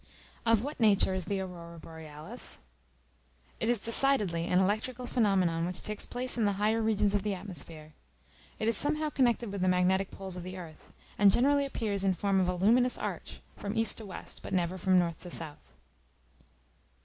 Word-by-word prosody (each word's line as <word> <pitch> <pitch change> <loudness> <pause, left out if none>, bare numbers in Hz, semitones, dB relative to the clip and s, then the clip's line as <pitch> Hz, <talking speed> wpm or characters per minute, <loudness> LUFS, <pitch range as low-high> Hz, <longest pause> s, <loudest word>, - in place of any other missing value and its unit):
Of 225 -1 +4
what 290 +3 -5
nature 205 -4 +4
is 185 -2 -1
the 200 -1 -1
Aurora 170 -2 -8
Borealis? 155 -2 -7 1.0
It 225 - 0
is 240 -2 +3
decidedly 215 -8 +2
an 180 - +2
electrical 215 +6 0
phenomenon 190 -9 +2
which 180 0 -6
takes 210 -1 -3
place 245 0 -3
in 220 - +3
the 205 - +2
higher 215 +2 +2
regions 210 -2 +2
of 205 - +2
the 205 0 -1
atmosphere. 165 -5 -8 0.6
It 220 - -1
is 230 - +3
somehow 305 +5 0
connected 240 -5 +1
with 200 -2 -4
the 185 - +2
magnetic 185 +1 +2
poles 190 -2 -7
of - - -5
the 185 +2 -7
earth; 165 -4 -11 0.3
and 200 -1 +7
generally 280 +4 +3
appears 205 -7 -2
in 190 -1 +2
form 195 +1 +1
of 185 - +2
a 180 - 0
luminous 235 +7 +3
arch, - - -5
from 205 +2 -4
east 225 +1 +2
to 220 - -8
west, 185 - -9
but - - -7
never 180 0 0
from 185 +1 +3
north 170 -2 +1
to 180 - -7
south. 160 -3 -6
195 Hz, 185 wpm, -30 LUFS, 180-225 Hz, 1.0 s, and